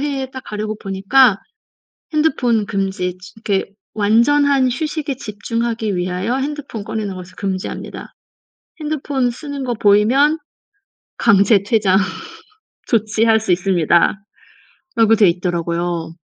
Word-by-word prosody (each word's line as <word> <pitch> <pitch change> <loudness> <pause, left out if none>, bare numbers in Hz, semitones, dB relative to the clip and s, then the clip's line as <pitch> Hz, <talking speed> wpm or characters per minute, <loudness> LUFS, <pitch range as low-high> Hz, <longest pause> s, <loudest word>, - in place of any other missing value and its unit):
해에 275 -2 -3
딱 260 0 -8
가려고 215 +1 -4
보니까 195 +4 +3 0.7
핸드폰 250 -8 +1
금지 190 -2 -2
지 180 0 -14
그 195 -3 +1 0.3
"완전한 260 +6 +3
휴식에 295 +1 -3
집중하기 225 -1 -3
위하여 185 +7 -1
핸드폰 275 -6 -4
꺼내는 215 -2 -4
것을 185 0 -10
금지합니다. 190 -2 -5 0.7
핸드폰 285 -4 -1
쓰는 285 +2 -6
것 245 -3 -2
보이면 245 +10 +4 0.8
강제 200 -2 +4
퇴장 200 -3 +2 0.9
조치할 220 -1 +2
수 220 -4 -2
있습니다."라고 180 +2 +1 0.8
돼 210 -5 +5
있더라고요. 170 -1 -2
215 Hz, 260 characters per minute, -18 LUFS, 190-260 Hz, 0.9 s, 돼